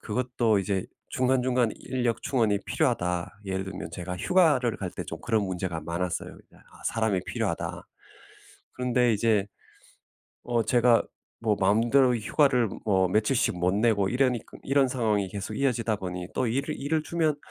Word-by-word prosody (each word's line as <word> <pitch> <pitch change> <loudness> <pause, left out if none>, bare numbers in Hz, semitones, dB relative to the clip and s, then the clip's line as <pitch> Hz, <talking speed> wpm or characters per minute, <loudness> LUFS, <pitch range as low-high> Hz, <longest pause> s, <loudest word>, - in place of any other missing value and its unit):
그것도 120 -1 0
이제 95 -1 -1 0.2
중간중간 125 -2 +2
'인력 125 -3 -2
충원이 115 -7 +1
필요하다.' 90 -1 0
예를 95 -1 -2
들면 95 - -7
제가 90 0 -5
휴가를 145 - +3
갈 95 -2 -4
때 - - -6
좀 80 - -7
그런 110 -3 +1
문제가 90 -3 -3
많았어요. 85 +2 -3
이제 - - -23
'아 - - -19
사람이 110 -4 0
필요하다.' - - -3 0.9
그런데 125 -1 +2
이제 105 -2 +2 1.0
어 120 -2 +1
제가 120 -1 +4 0.4
뭐 110 -3 +1
마음대로 120 +6 +4
휴가를 125 0 +2 0.2
뭐 95 -3 +3
며칠씩 110 +1 +1
못 90 +2 +1
내고 105 -3 +2
이러니ㄲ 125 -2 -1
이런 135 0 +3
상황이 110 -6 0
계속 100 +2 -5
이어지다 120 -5 0
보니 90 -2 -5
또 130 - 0
일을 130 +5 -2
일을 155 +3 0
주면 160 -3 0
115 Hz, 330 characters per minute, -27 LUFS, 95-125 Hz, 1.0 s, 제가